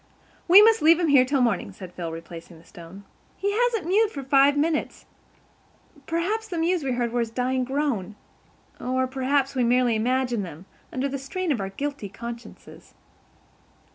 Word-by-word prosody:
"We 380 +4 +9
must 450 0 +4
leave 330 +2 +5
him 340 -3 +1
here 270 -3 +6
till 275 0 0
morning," 225 -5 0
said 185 -2 -11
Phil, 170 -2 -5
replacing 165 +1 -10
the 165 - -19
stone. 175 +4 -13 0.3
"He 405 - -1
hasn't 455 -3 0
mewed 415 +5 +3
for 280 -9 -7
five 275 +2 +4
minutes. 305 +1 -1 1.0
Perhaps 395 +7 -2
the 355 - -5
mews 335 0 0
we 265 -2 -1
heard 240 -1 -1
were 245 - -1
his 230 -1 -1
dying 255 +2 -1
groan. 255 -7 -2 0.6
Or 260 +1 -1
perhaps 270 +1 0
we 255 -2 0
merely 245 -1 +2
imagined 245 0 0
them, 170 0 -10 0.3
under 260 +2 -2
the 275 0 -4
strain 365 +5 -3
of 240 -8 -1
our 195 - -4
guilty 275 0 -5
consciences." 235 +3 -10
260 Hz, 170 wpm, -24 LUFS, 230-315 Hz, 1.0 s, We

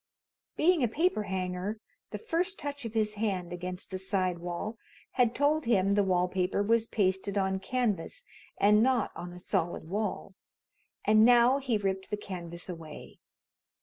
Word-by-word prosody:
Being 340 0 +4
a 245 - +3
paper 310 +1 +1
hanger, 185 +3 -3 0.3
the - - -5
first 370 -2 -1
touch 285 -2 -5
of 230 0 -6
his 215 -1 +1
hand 185 -5 -1
against 180 +2 -6
the 190 - -3
side 185 -2 0
wall 175 +6 -5 0.3
had 245 -2 +2
told 295 +1 +2
him 200 -4 +3
the 205 0 +3
wall 180 -2 +2
paper 185 +2 0
was 230 +2 +2
pasted 195 -1 0
on 190 -1 +1
canvas 240 - -2 0.4
and 210 +1 +5
not 250 -2 +2
on 175 0 -7
a 175 - -10
solid 175 -2 -2
wall, 200 +1 -3 0.7
and 215 +1 +6
now 245 +3 +6
he 255 -5 0
ripped 190 -1 -2
the 210 - -2
canvas 170 -4 -7
away. 165 -4 -9
205 Hz, 160 wpm, -30 LUFS, 185-235 Hz, 0.7 s, and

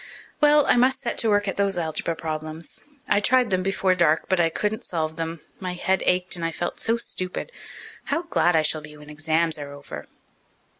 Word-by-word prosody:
Well, 295 0 +6
I - - +4
must 255 +2 +4
set 235 - -2
to 225 - +2
work 205 0 +2
at 195 - -2
those 200 -2 +1
algebra 165 0 -2
problems. 155 0 -5 0.2
I 205 - +3
tried 250 +1 +3
them 185 -1 +2
before 190 0 +2
dark, 165 -3 +2
but 185 -2 +1
I 165 -1 +4
couldn't 210 +6 -2
solve 160 -2 -2
them. 165 -1 -4 0.2
My 185 -2 -3
head 190 +1 +1
ached 180 0 +2
and 170 - -6
I 165 - 0
felt 175 +2 -4
so 230 +1 +1
stupid. 185 - -3 0.5
How 330 - -1
glad 180 - +2
I 160 - +4
shall 155 0 +1
be 150 0 -12
when 150 0 -12
exams 160 +1 0
are 145 -1 -6
over." 110 - -9
175 Hz, 205 wpm, -24 LUFS, 155-200 Hz, 0.5 s, Well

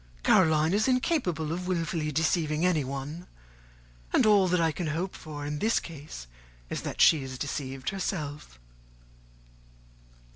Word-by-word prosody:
Caroline 160 -2 +4
is 215 +4 +2
incapable 245 - 0
of 180 +1 -4
wilfully 165 -3 -1
deceiving 155 +1 +1
anyone; 150 0 -2 0.8
and - - +4
all 205 -3 +5
that 180 0 +2
I 165 -1 +2
can 170 +1 -4
hope 170 +5 -2
in 145 -1 -4
this 225 +6 +2
case 145 - -9 0.5
is, - - -2
that - - -6
she 155 -3 +6
is 130 -1 -6
deceived 135 -1 -4
herself." 150 - -4
160 Hz, 130 wpm, -28 LUFS, 145-180 Hz, 0.8 s, she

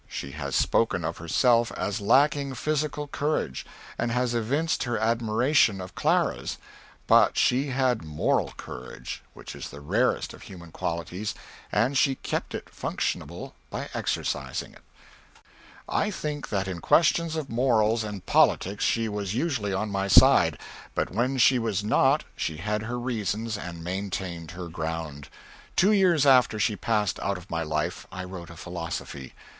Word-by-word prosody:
She 70 - -6
has 70 -2 -4
spoken 95 -7 +2
of 80 +1 -3
herself 115 +8 +3
as 105 +1 -2
lacking 140 +4 +3
physical 150 +2 -1
courage, 145 - -2 0.3
and 120 - 0
has 125 0 0
evinced 140 +8 0
her 120 -2 -1
admiration 115 0 +2
of 95 0 -7
Clara's; - - 0 0.5
but - - +5
she 130 +3 +3
had 130 -3 +1
moral 75 -1 0
courage, 60 +1 -8
which - - -9
is - - -7
the 70 - -10
rarest 105 - 0
of - - -13
human 85 -4 -11
qualities, 85 +7 -3 0.4
and 115 +8 +2
she 135 0 +3
kept - - -3
it - - -6
functionable - - -3 0.2
by - - -5
exercising - - -2
it. - - -17 1.1
I 210 - +1
think 150 -7 -4
that 100 -2 -1
in 90 -2 -4
questions 165 0 +3
of 150 -5 -4
morals 115 -2 +2
and 105 -3 -6
politics 100 +2 +3
she 115 -1 +1
was 105 -1 -3
usually 125 -8 -1
on 100 +2 -2
my 100 0 -1
side; 100 - +6 0.4
but - - -1
when 125 +7 0
she 130 +1 +5
was 110 -4 -1
not 105 - +3
she 80 - -3
had 105 +5 -2
her 120 +3 -4
reasons 115 -2 -2
and 85 -4 -7
maintained 90 -2 -4
her 90 -1 -5
ground. 80 -3 -5 0.5
Two 195 +4 +5
years 180 -8 +4
after 125 -5 +5
she 105 0 +2
passed 105 -2 0
out 100 -1 -1
of 90 0 -13
my 85 0 -1
life 75 +2 -2
I 95 -1 -5
wrote 90 -2 -8
a 85 - -10
Philosophy. 85 -6 -6
105 Hz, 155 wpm, -26 LUFS, 90-130 Hz, 1.1 s, side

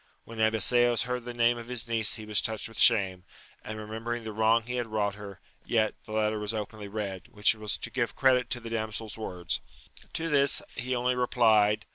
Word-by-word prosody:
When 115 -1 -10
Abiseos 115 +2 +3
heard 125 -1 -3
the 120 - -5
name 120 0 +2
of 115 - -9
his 120 -2 -2
niece 115 -2 +2
he 110 -1 -7
was 105 -1 +2
touched 110 -1 -2
with 115 - -10
shame, 95 -3 +4 0.4
remembering 110 +2 -5
the 110 - -5
wrong 110 +2 +3
he 125 +2 -4
had 120 -2 -2
wrought 105 -2 -1
her; 100 -2 -10 0.2
yet, 110 -2 +1
the 110 - -8
letter 110 0 +1
was 105 +1 -2
openly 105 0 -5
read, 100 -3 -5
which 105 -4 +3
was 110 -2 -2
to - - -5
give - - -1
credit 130 -2 +3
to 120 - -1
the 115 -1 -9
damseFs 110 -1 -3
words. 90 -6 -3 0.5
To 165 - -1
this 140 -3 +3
he 130 +1 -2
only 125 +1 +1
replied. 110 -4 +3
110 Hz, 200 wpm, -28 LUFS, 105-120 Hz, 0.5 s, shame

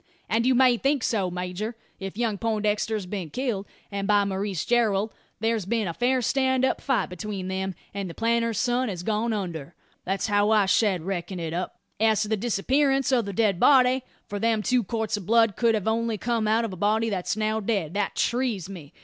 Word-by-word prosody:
"And 230 +2 +1
you 260 - +4
may 250 -1 +5
think 275 0 +1
so, 200 -5 0
major. 180 +5 -4 0.2
If 195 +1 -6
young 225 -4 -1
Poindexter's 215 -2 0
been 180 -3 -5
killed, 230 - -2 0.2
and 200 -1 -3
by 205 -1 +4
Maurice 195 -2 -2
Gerald, 220 -3 +1 0.3
there's 225 -3 0
been 220 -2 0
a 170 - -3
fair 250 +5 +1
stand 260 +1 +2
up - - 0
fight 265 -8 0
atween 190 0 -5
them, 190 0 -3 0.2
and 200 -2 -4
the 165 - -9
planter's 230 -1 +1
son 250 0 +1
has 180 -3 -5
gone 220 +3 0
under. 170 -7 -4 0.3
That's 195 +1 -1
how 205 -1 +2
I 215 -2 +4
shed 190 -3 +2
reckon 185 0 -4
it 165 -1 -4
up. 180 +2 -4 0.2
As 220 -1 +3
to - - -4
the 220 - +2
disappearance 270 +6 +1
o' 255 -2 +4
the 200 -2 -5
dead 200 -2 +1
body 260 0 +5 0.2
for 205 - -5
them 225 0 +1
two 250 0 +2
quarts 220 0 -2
o' - - -8
blood 225 +2 +3
could 230 -2 +3
only 230 0 +1
have - - -8
come 230 -2 0
out 225 +2 +2
o' 210 - -5
a - - -5
body 215 +4 +1
that's 190 +1 -2
now 215 0 0
dead 195 -7 -1
that 205 0 -1
trees 235 -7 0
me. 175 -6 -10
215 Hz, 210 wpm, -26 LUFS, 195-235 Hz, 0.3 s, may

